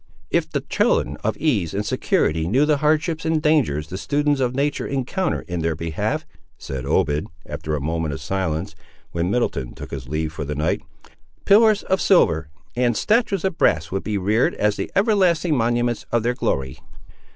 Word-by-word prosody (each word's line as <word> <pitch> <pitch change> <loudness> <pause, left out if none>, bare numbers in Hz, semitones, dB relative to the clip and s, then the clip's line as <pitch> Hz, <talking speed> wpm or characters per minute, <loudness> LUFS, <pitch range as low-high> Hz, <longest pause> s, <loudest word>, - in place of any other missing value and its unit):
"If - - +1
the - - -2
children - - +1
of - - -2
ease 105 - 0
and 105 +1 -1
security 80 -5 +1
knew 130 +10 +3
the 150 -1 +2
hardships 155 +2 +1
and 160 0 +1
dangers 130 - +1
the 95 - -5
students 145 +1 +1
of 125 -1 0
nature 145 +2 0
encounter 140 +8 -1
in 90 -1 -5
their 80 -1 0
behalf," 80 0 -2 0.3
said 65 -1 -6
Obed, 75 +1 +1 0.2
after 75 0 -4
a - - -2
moment 80 +2 -2
of - - -7
silence, 80 0 -2 0.4
when 85 +1 -1
Middleton 95 - -1
took - - -9
his 65 -3 -6
leave 80 +1 -2
for 80 - -4
the 75 +1 -4
night, 75 +2 0 0.6
"pillars 215 0 +5
of 190 - 0
silver, 80 - +3 0.3
and 120 -2 +1
statues 210 -5 +1
of 190 -3 -2
brass 80 +2 +2
would 95 +1 -2
be 105 0 -1
reared 105 +5 +1
as 105 0 +1
the - - -4
everlasting 185 -6 +3
monuments 120 -1 0
of 120 -2 +1
their 120 +1 +1
glory!" 65 - -2
110 Hz, 180 wpm, -22 LUFS, -, 0.6 s, pillars